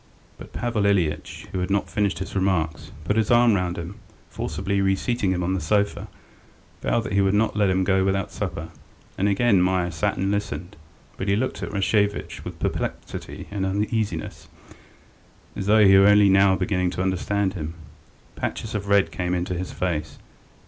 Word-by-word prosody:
But - - -11
Pavel 115 -4 -1
Ilyitch, 80 -7 -1
who 95 - -2
had 90 +1 -2
not 100 0 +1
finished 100 -4 0
his 95 +2 -6
remarks, 90 -5 -1
put 105 +7 0
his 110 -1 +1
arm 120 -1 +5
round 90 -3 -1
him 85 0 -5
and, - - -14 0.3
forcibly 100 +1 -2
reseating 95 +2 +1
him 90 -1 -1
on 90 +2 0
the 95 - -1
sofa, 100 +7 0 0.7
vowed 115 - +1
that - - -5
he 100 - +3
would 95 +1 +2
not 110 +2 +1
let 105 -2 +2
him 95 0 +2
go 95 +1 +2
without 95 0 0
supper. - - -4 0.5
And 100 +2 +1
again 100 -1 +3
Meier 90 -1 +1
sat 80 -2 -1
and 95 +1 0
listened, 100 -1 -3 0.4
but 95 - -4
he 100 - +3
looked 130 +5 -2
at - - -4
Rashevitch 100 +1 0
with - - -7
perplexity - - -4
and 100 -1 -2
uneasiness, 100 -2 -2 1.1
as 95 - -4
though 105 0 +6
he 95 0 +7
were 100 - +6
only 105 -1 +6
now 95 0 +5
beginning 90 -3 0
to 90 - 0
understand 95 +1 0
him. 80 -3 -5 0.6
Patches 110 - -4
of 100 -1 -3
red 100 -4 +3
came 90 +3 -2
into 90 +1 -2
his 90 +1 -4
face. 75 -5 -3
95 Hz, 185 wpm, -24 LUFS, 90-100 Hz, 1.1 s, he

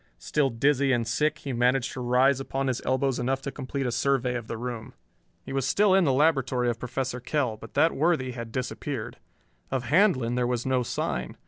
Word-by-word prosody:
Still 140 - 0
dizzy 135 +3 +2
and 120 -3 +1
sick, 150 +7 +1
he 135 - -5
managed 125 +2 +1
to 130 - -5
rise 125 +2 +3
upon 135 0 -3
his 130 -2 -1
elbows 130 0 0
enough 130 +2 0
to 140 - -4
complete 135 0 -4
a 125 - 0
survey 130 -1 +1
of 120 -2 -5
the 115 - -4
room. 120 -1 -6 0.5
He - - -6
was 135 -1 0
still 200 +6 +3
in 190 -2 +4
the 140 - +3
laboratory 130 -4 +2
of 115 - -7
Professor 125 0 -3
Kell, 125 -2 -1
but 110 +1 -13
that 165 - +4
worthy 145 -4 +1
had 115 -2 -7
disappeared. 130 -1 -4 0.5
Of 130 -2 -1
Handlon 130 - +3
there 125 0 +1
was 120 -1 -2
no 130 -1 +1
sign. 65 - -3
130 Hz, 205 wpm, -27 LUFS, 120-140 Hz, 0.5 s, in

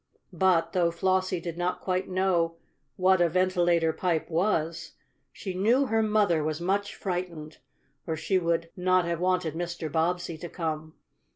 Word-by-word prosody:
But, 170 -2 +2
though 175 -2 +3
Flossie 185 +1 0
did 170 0 -6
not 180 +1 -1
quite 185 0 -2
know 180 -3 +1 0.4
what 185 0 +3
a 170 - +4
ventilator 175 -2 +2
pipe 170 -2 -1
was, 165 -2 0 0.4
she 190 - -6
knew 230 +9 +3
her 225 -3 +1
mother 210 -7 +2
was 155 +1 -2
much 200 +3 -1
frightened, 175 -5 -5 0.5
or 160 - -1
she 185 +5 +1
would 170 -1 -1
not 185 -1 +2
have 170 -1 -2
wanted 180 -3 0
Mr. 170 -2 -4
Bobbsey 165 +1 -1
to 175 - -7
come. 160 -2 -4
175 Hz, 155 wpm, -27 LUFS, 165-185 Hz, 0.5 s, a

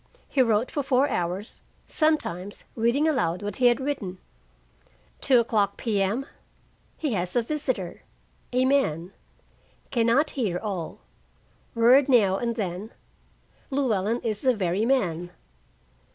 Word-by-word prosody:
He 270 - +2
wrote 230 0 +2
for 290 - -1
four 270 0 +2
hours, 180 +4 -3 0.2
sometimes 205 - -1
reading 235 +7 +2
aloud 205 - 0
what 205 -1 -4
he 250 - +5
had 240 +1 +3
written. 260 -10 -3 1.0
2:00 225 -6 +2
P.M. 215 +3 0 0.7
He 295 -6 -2
has 180 -2 -1
a 240 - +3
visitor, 255 - -3 0.5
a 250 +1 +2
man. 195 - +1 0.8
Can 235 -3 +2
not 280 +7 +3
hear 210 -10 -1
all 190 -5 -5 0.7
word 250 +4 +5
now 205 -7 +4
and 235 -1 -2
then. 200 0 -4 0.8
"Llewellyn 235 -5 0
is 215 -3 -2
the 255 -2 +3
very 195 +2 0
man." 175 -10 0
230 Hz, 125 wpm, -26 LUFS, 190-260 Hz, 1.0 s, he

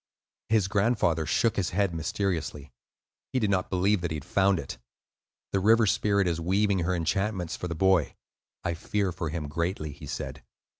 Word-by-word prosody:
His 110 -4 +3
grandfather 100 -6 +1
shook 115 +7 +2
his 95 -4 +1
head 100 -4 +2
mysteriously; 80 -4 -2 0.6
he - - 0
did 105 -5 +1
not 95 -2 0
believe 95 +1 +2
that 85 - -1
he 80 - -3
had 75 - -6
found 100 -1 +3
it. 80 - -6 0.7
"The 100 - +2
River 110 +3 +5
Spirit 100 -1 +2
is 85 -1 -1
weaving 100 +3 +2
her 90 +2 0
enchantments 90 +1 -1
for 90 - -5
the 85 - -4
boy; 95 -1 +2 0.5
I 85 - -1
fear 95 +3 -1
for 85 -2 -4
him 75 -1 -4
greatly," 85 0 -2
he 70 - -11
said. - - -5
95 Hz, 180 wpm, -28 LUFS, 85-100 Hz, 0.7 s, River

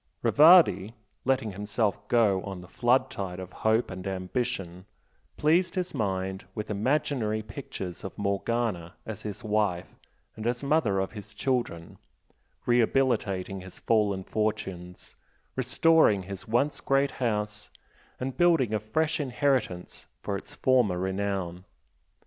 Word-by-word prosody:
Rivardi, 120 - +6 0.3
letting 130 -4 +1
himself 105 +1 -2
go 105 -6 +3
on 95 -1 -6
the 90 - -12
flood 125 +6 +2
tide 95 -2 -5
of 95 0 -8
hope 110 +1 +1
and 95 +1 -6
ambition, 95 -1 -3 0.5
pleased 170 +5 +2
his 185 -1 -2
mind 95 -5 -2
with 105 0 -4
imaginary 110 -1 0
pictures 105 -5 -7
of 95 - -7
Morgana 100 -3 -1
as 110 -3 -6
his 105 +2 -6
wife 105 -5 0 0.4
and 110 +1 -4
as 120 +2 -1
mother 140 -9 +2
of 95 - -2
his 105 -3 -10
children, 120 -11 -2 0.7
rehabilitating 115 -6 +1
his 95 0 -11
fallen 105 -4 +1
fortunes, 95 -5 -4 0.4
restoring 130 - +4
his 95 0 -8
once 120 +6 +1
great 135 0 +2
house 105 -3 -1 0.5
and 130 0 -3
building 165 - +3
a 110 - +1
fresh 155 +10 0
inheritance 130 -9 -1 0.2
for 100 - -2
its 100 - -8
former 125 -8 +3
renown. 95 -1 -2
105 Hz, 125 wpm, -28 LUFS, 95-125 Hz, 0.7 s, Rivardi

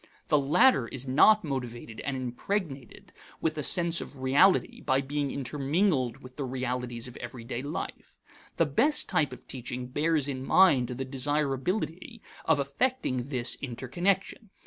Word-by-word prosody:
The 150 - +4
latter 140 - +4
is 135 +1 -5
not 210 +11 +5
motivated 120 -5 -5
and 140 -1 -3
impregnated 135 - -4 0.3
with 160 -1 -1
a 150 - -3
sense 170 +3 +2
of 145 - -9
reality 135 +9 +3
by 130 +1 +1
being 140 +1 -2
intermingled 140 - -1
with 130 0 -13
the 145 - -3
realities 125 -2 -3
of 125 - -11
everyday 120 0 -6
life. 145 +2 -6 0.4
The 165 - +4
best 280 - +2
type 145 -4 +1
of 125 0 -11
teaching 125 -1 -5
bears 150 +3 0
in 130 -2 -4
mind 140 -6 +5
the 130 +2 -4
desirability 150 - -1 0.3
of 160 -3 +3
affecting 140 - -1
this 125 -4 +2
interconnection. 175 - -2
135 Hz, 145 wpm, -28 LUFS, 125-160 Hz, 0.4 s, not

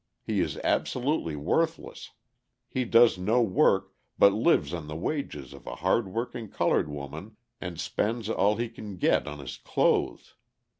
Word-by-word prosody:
He - - -1
is - - -1
absolutely 125 - 0
worthless: 160 - -1 0.6
he 130 -1 -2
does 115 -4 +5
no 110 +6 +2
work, 95 -5 +2 0.2
but 100 - +6
lives 105 - +2
on 85 -3 -5
the 75 - -6
wages 80 - -4
of 70 - -14
a - - -5
hard 95 +6 +1
working 115 +1 -4
coloured 75 - +1
woman 75 +9 -8 0.2
and 90 -3 -6
spends 110 +5 -1
all 105 -1 +2
he 120 +2 -2
can 105 -4 -9
get - - +2
on 75 0 -6
his 70 -3 -7
clothes. - - 0
100 Hz, 155 wpm, -28 LUFS, 80-120 Hz, 0.6 s, but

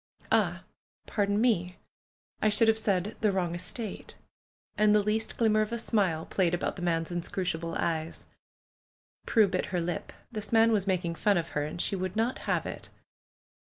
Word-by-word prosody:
"Ah! - - +2 0.4
Pardon 205 -1 0
me! 185 -7 +1 0.7
I 215 - +4
should 220 +2 +3
have 220 0 +4
said 200 0 0
^the 215 - +3
wrong 180 -3 -1
estate.' 185 +5 -5 0.3
" - - -56
And 210 0 +4
the 210 - +4
least 215 +2 -1
glimmer 215 -2 +3
of 215 - -2
a 235 - -1
smile 195 -8 +1
played 175 -3 +1
about 175 - -2
the 180 - -8
man's 165 -1 0
inscrutable 170 -1 -2
eyes. 160 -1 -2 1.0
Prue 220 -3 +5
bit 185 -1 -1
her 180 - -1
lip. 170 -1 -3 0.2
This 215 -1 -5
man 225 0 +5
was 205 -3 +1
making 180 -3 0
fun 200 +3 +2
of 170 -1 -2
her, 150 -1 -1
and 155 +3 -6
she 195 - 0
would 185 0 -3
not 230 +3 0
have - - +1
it. - - -7
195 Hz, 180 wpm, -29 LUFS, 175-215 Hz, 1.0 s, Prue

